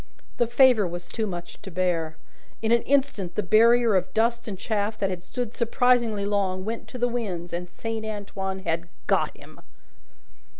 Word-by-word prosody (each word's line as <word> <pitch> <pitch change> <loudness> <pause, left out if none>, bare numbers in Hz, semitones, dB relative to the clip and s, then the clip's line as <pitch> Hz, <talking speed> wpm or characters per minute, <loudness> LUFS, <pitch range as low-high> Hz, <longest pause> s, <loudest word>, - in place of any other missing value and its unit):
The 240 - +2
favour 240 -4 +5
was 175 0 -6
too 220 -2 -2
much 175 -2 -7
to - - -8
bear; 165 -3 -1 0.5
in 220 - +1
an 235 0 +5
instant 270 -10 +1
the 210 - 0
barrier 230 +3 +5
of 185 -1 +1
dust 235 +1 +1
and 200 -3 -4
chaff 215 +1 -1
that 195 -1 0
had 180 -1 -4
stood 240 +5 -4
surprisingly 235 -3 +2
long, 195 -2 0
went 225 +1 -4
to - - -8
the 245 0 +2
winds, 195 -8 -3
and 175 +1 -4
Saint 225 +2 -4
Antoine 195 -3 -4
had 170 +1 -1 0.2
got - - +1
him! - - -15
210 Hz, 175 wpm, -26 LUFS, 185-235 Hz, 0.5 s, favour